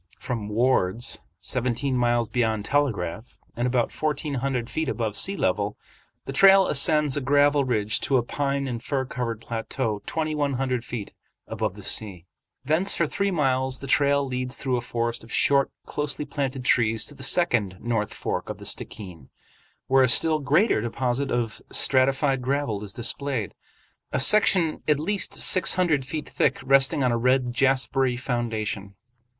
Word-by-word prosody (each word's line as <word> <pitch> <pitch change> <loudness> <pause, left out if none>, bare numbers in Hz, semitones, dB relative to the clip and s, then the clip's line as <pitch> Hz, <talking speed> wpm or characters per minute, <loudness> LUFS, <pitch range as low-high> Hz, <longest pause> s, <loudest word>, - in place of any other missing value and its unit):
From 110 -4 -5
"Ward's," 115 -2 +1 0.2
seventeen 125 +2 -1
miles 120 -1 +1
beyond 110 -3 -1
Telegraph, 110 -7 -2 0.2
and 120 +1 -1
about 125 -2 0
fourteen 150 -1 -2
hundred 130 -2 -2
feet 150 +4 -2
above 110 -5 -2
sea 195 +1 0
level, 100 +3 -1 0.5
the 135 - -5
trail 195 +5 +7
ascends 150 -1 +2
a 145 - -1
gravel 145 +1 +3
ridge 110 -4 0
to 135 - +2
a 120 - +1
pine 140 +2 -2
and 120 -3 -4
fir 135 -2 -1
covered 120 -4 -4
plateau 115 -1 -3
twenty 155 -1 -2
one 145 -2 0
hundred 130 -2 -1
feet 120 -5 -6 0.3
above - - -3
the - - -11
sea. 95 -6 -2 0.4
Thence 160 +7 +2
for 170 - +1
three 200 +6 -1
miles 130 -6 0
the - - -8
trail 140 +1 +2
leads 125 0 -4
through 130 -2 -1
a 120 - -1
forest 120 -1 -3
of 115 - -14
short, 140 -1 +3 0.2
closely 150 0 -3
planted 135 -2 -4
trees 115 -3 +2
to - - -9
the 140 - -13
second 120 - +1
North 115 -2 -2
Fork - - -4
of - - -5
the - - -11
Stickeen, 90 -10 -4 0.6
where 135 0 +4
a 130 - +4
still 155 +4 +5
greater 150 - +2
deposit 125 +3 -2
of 120 -2 -2
stratified 135 0 +1
gravel 125 -5 -2
is 100 - -7
displayed, 120 0 -2 0.6
a - - 0
section 185 -6 +3
at 150 -2 +3
least 200 +6 -1
six 185 - +2
hundred 160 -7 +1
feet 150 +3 -5
thick - - +1
resting 135 0 +3
on 125 - +2
a 120 - 0
red 125 0 +1
jaspery 130 -1 +1
formation. 110 -5 -3
130 Hz, 165 wpm, -25 LUFS, 115-140 Hz, 0.6 s, trail